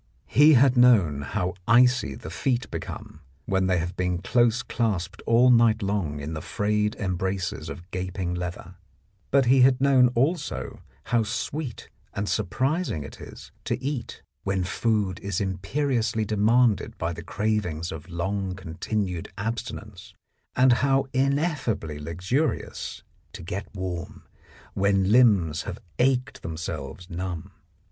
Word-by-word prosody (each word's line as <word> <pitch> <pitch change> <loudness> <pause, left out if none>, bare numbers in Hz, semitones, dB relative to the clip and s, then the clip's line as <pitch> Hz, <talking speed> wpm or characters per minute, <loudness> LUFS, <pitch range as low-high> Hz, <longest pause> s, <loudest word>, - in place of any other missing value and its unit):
He 150 - +6
had 130 0 +5
known 105 - +5
how 95 +4 -2
icy 125 +2 +4
the 115 - -9
feet 125 -2 -1
become - - -7 0.2
when 95 +2 +1
they 90 -1 +2
have 85 +1 -3
been 90 -1 0
close 120 +5 +2
clasped 100 -5 -2
all 120 +2 +6
night 115 -2 +4
long 95 -8 -1
in 75 +3 -5
the 75 - -4
frayed 105 +4 0
embraces 95 -1 -2
of 90 +2 -9
gaping 90 -1 -3
leather, 90 0 -6 0.5
but 140 -1 +4
he 130 +2 +5
had 130 0 +5
known 135 -2 +5
also 150 +6 -1 0.2
how 120 -1 +1
sweet 120 +4 -4 0.3
and 100 +1 -2
surprising 130 - -1
it - - -10
is - - -11
to - - -1
eat 130 -2 -4 0.2
when 95 -1 0
food 100 -1 0
is 100 -2 -2
imperiously 110 +4 -1
demanded 110 +2 +2
by 85 +1 -2
the 85 - -7
cravings 90 -4 -2
of 80 +2 -8
long 95 +2 -2
continued 90 +1 -3
abstinence, 105 -3 -5 0.4
and 130 0 +5
how 135 +2 +2
ineffably 135 - 0
luxurious 90 - -2 0.3
to - - -8
get 95 +4 -5
warm 90 -2 -5 0.5
when 100 0 +2
limbs 100 -11 +4
have - - -6 0.2
ached 125 0 +1
themselves 80 0 -6
numb. 90 -2 -5
100 Hz, 135 wpm, -25 LUFS, 90-125 Hz, 0.5 s, He